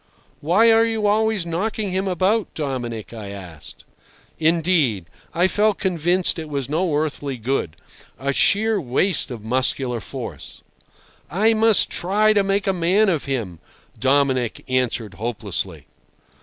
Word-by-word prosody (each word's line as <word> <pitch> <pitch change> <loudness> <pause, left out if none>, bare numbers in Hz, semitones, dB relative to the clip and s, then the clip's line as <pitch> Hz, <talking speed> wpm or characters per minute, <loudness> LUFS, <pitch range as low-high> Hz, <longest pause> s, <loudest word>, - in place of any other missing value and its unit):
"Why 200 +10 +4
are 225 0 +5
you 225 -2 -1
always 215 -2 +1
knocking 200 +4 -2
him 190 +1 -1
about, 190 +4 +1
Dominic?" 120 -7 -4
I 110 -3 -7
asked. 90 -6 -10 0.5
Indeed, 160 - +2 0.3
I 175 +2 +2
felt 210 +1 +1
convinced 180 -1 +1
it 160 -1 -6
was 140 -3 -2
no 160 +2 0
earthly 145 -3 -2
good—a 130 - -4
sheer 210 +5 +2
waste 145 +8 0
of 120 -4 -7
muscular 125 +1 -1
force. 105 - -8 0.7
"I 215 +7 +3
must 220 -1 +4
try 210 +4 +2
to 205 - +3
make 195 +1 0
a 195 - +1
man 185 +4 +2
of 165 -6 -1
him," 115 -12 -3 0.4
Dominic 130 -2 +1
answered 125 -5 -1
hopelessly. 115 +2 -4
165 Hz, 130 wpm, -21 LUFS, 130-200 Hz, 0.7 s, are